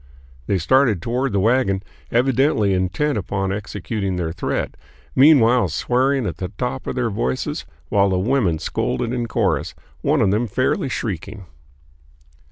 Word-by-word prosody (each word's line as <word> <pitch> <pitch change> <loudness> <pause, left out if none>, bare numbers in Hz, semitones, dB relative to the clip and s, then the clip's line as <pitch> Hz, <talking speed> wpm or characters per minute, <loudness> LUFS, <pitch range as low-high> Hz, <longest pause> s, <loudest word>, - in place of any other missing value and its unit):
They 100 - +2
started 110 - +3
toward 125 +7 -1
the 100 - +1
wagon, 105 -3 +2 0.3
evidently 125 -4 +2
intent 100 +9 0
upon 95 0 -2
executing 100 -1 -3
their 85 -2 -2
threat, 85 - -3 0.4
meanwhile 125 -6 +6
swearing 130 - +1
at - - -3
the 90 - -3
top 130 +1 -3
of - - -3
their 120 -3 0
voices 65 -8 -2 0.2
while 100 -1 +3
the 95 - +1
women 100 -4 +1
scolded 115 +8 -2
in 120 -2 -2
chorus, - - 0 0.3
one - - +2
of 95 - +3
them 110 +4 +1
fairly 130 +5 0
shrieking. 100 -3 -4
110 Hz, 145 wpm, -21 LUFS, 95-130 Hz, 0.4 s, meanwhile